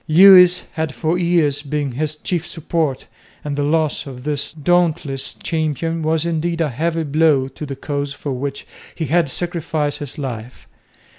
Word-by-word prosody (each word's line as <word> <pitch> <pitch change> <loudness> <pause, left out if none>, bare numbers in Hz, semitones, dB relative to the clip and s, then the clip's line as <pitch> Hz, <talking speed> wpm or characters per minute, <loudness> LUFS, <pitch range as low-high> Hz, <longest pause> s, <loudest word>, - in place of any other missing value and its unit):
Lewis 180 +1 +8
had 160 -2 -2
for 160 +1 0
years 165 -5 +2
been 145 -1 -2
his 150 +4 -2
chief 170 +1 -2
support, 160 -4 -2 0.4
and 145 -1 -3
the 145 - -1
loss 155 0 0
of 125 -2 -9
this 145 -1 -2
dauntless 160 -3 0
champion 165 0 -2
was 160 +1 +1
indeed 170 0 -1
a 160 -3 +1
heavy 165 +6 -1
blow 150 -2 +3
to 140 +3 -8
the 135 - -5
cause 140 0 -3
for 145 0 -5
which 140 +2 -4 0.3
he 160 - -2
had 165 0 +2
sacrificed 160 -3 -2
his 145 -3 -6
life. 125 -4 -6
155 Hz, 160 wpm, -19 LUFS, 140-165 Hz, 0.4 s, Lewis